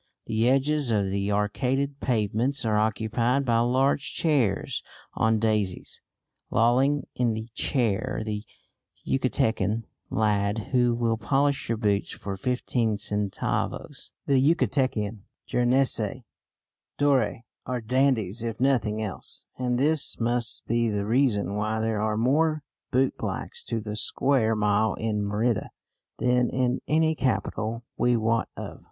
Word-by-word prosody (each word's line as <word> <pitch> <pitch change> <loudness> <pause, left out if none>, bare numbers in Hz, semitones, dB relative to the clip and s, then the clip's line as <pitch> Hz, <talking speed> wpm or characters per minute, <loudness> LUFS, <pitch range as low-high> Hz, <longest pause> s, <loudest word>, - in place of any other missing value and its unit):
The 115 +2 +1
edges 140 +1 +1
of 100 -4 +1
the 100 +1 -1
arcaded 130 +7 0
pavements 120 +2 0
are 110 -1 +1
occupied 115 +5 +1
by 115 -2 +3
large 130 +4 +1
chairs 140 - +1 0.3
on 110 0 +2
daises; 105 -4 -1 0.5
lolling 130 +5 +3
in 120 -3 0
the 110 +1 -6
chair 120 -1 0
the 105 -1 -3 0.6
Yucatecan 115 -5 0 0.3
lad 105 0 0
who 120 -2 +3
will 115 -1 0
polish 140 +3 0
your 115 - 0
boots 105 -2 0
for 100 -1 -5
fifteen 115 0 -1
centavos. 105 -1 -3 0.2
The 135 -2 +3
Yucatecan 130 -8 +1 0.3
jeunesse 125 -2 +1 0.7
dorée 130 -6 +2 0.2
are 125 -1 -1
dandies 120 -4 +1
if 115 -1 -4
nothing 115 -5 +1
else, 100 -3 -6
and 125 -1 0
this 150 +3 +2
must 120 0 0
be 115 0 +1
the 100 -1 -1
reason 110 -5 +1
why 110 +1 -1
there 110 -1 0
are 110 0 0
more 155 +6 +2 0.3
bootblacks 130 +1 -1
to 115 -1 -2
the 105 -1 -5
square 115 0 +1
mile 105 0 +2
in 110 -2 -1
Merida 105 +2 0 0.5
than 125 -1 +2
in 130 -1 0
any 160 +1 +3
capital 115 -5 -2
we 120 -1 +3
wot 115 +1 0
of. - - -7
115 Hz, 125 wpm, -26 LUFS, 105-130 Hz, 0.7 s, by